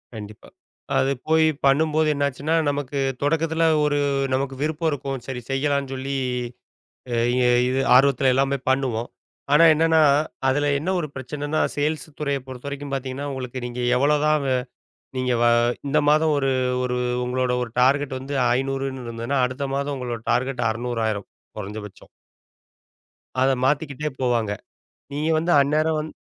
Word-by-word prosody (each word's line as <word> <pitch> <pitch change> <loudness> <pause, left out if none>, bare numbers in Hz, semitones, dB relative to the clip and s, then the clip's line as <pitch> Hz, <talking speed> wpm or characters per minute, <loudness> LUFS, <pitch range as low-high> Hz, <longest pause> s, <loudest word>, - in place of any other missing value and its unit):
கண்டிப்பா. 105 0 -10 0.5
அது 135 - +2 0.2
போய் 160 0 +4 0.2
பண்ணும்போது 155 +3 +3
என்ன 140 0 0
ஆச்சுன்னா, 145 +4 -2
நமக்குத் 135 -2 -2
தொடக்கத்துல 165 +2 +1 0.2
ஒரு 145 -1 +1 0.4
நமக்கு 135 0 -1
விருப்பம் 155 +2 0
இருக்கும். 135 -2 -4
சரி 130 -2 -5
செய்யலான்னு 140 0 0
சொல்லி, 135 +1 -4 1.0
ய - - +1 0.2
ய 125 - +3 0.2
இது 130 +1 0 0.2
ஆர்வத்துலல்லாம் 135 0 +3
போய் 130 -1 -5
பண்ணுவோம். 125 -3 -1 0.4
ஆனா 150 - +7
என்னன்னா 160 0 +3 0.5
அதுல 145 +2 +2
என்ன 165 - -3
ஒரு 160 - -3
பிரச்சனன்னா 145 +3 -3
சேல்ஸ் 150 +2 -1
துறைய 140 -2 -1
பொறுத்த 130 +1 -8
வரைக்கும் 140 0 -6
பாத்தீங்கன்னா, 135 +1 -4
உங்களுக்கு 130 -1 -5
நீங்க 125 0 -5 0.2
எவ்வளோ 145 +3 +3
தான், 150 -2 +2 0.7
நீங்க 125 -1 0
வ - - +4 0.4
இந்த 150 +2 +3
மாதம் 155 0 +3
ஒரு 135 -1 +1 0.3
ஒரு 125 0 -1 0.3
உங்களோட 125 0 0
ஒரு 115 - -12
டார்கெட் 135 0 +2
வந்து 140 +2 -4 0.2
500ன்னு 135 -1 -3
இருந்ததுன்னா. 115 +4 -2
அடுத்த 130 +3 -4
மாதம் 140 0 -2
உங்களோட 120 -3 -4
டார்கெட் 125 -1 0
600 120 0 -3
ஆயிரும் 100 -2 -4 0.3
குறைஞ்ச 105 +1 -6
பட்சம். 95 - -16 1.3
அத 130 +1 +4
மாத்திக்கிட்டே 150 +1 -1
போவாங்க. 120 -4 +1 0.6
நீங்க 150 +2 -1
வந்து 170 +2 0
அந்நேரம் 155 +3 +1
வந் 155 +1 -5
135 Hz, 145 wpm, -23 LUFS, 125-150 Hz, 1.3 s, ஆனா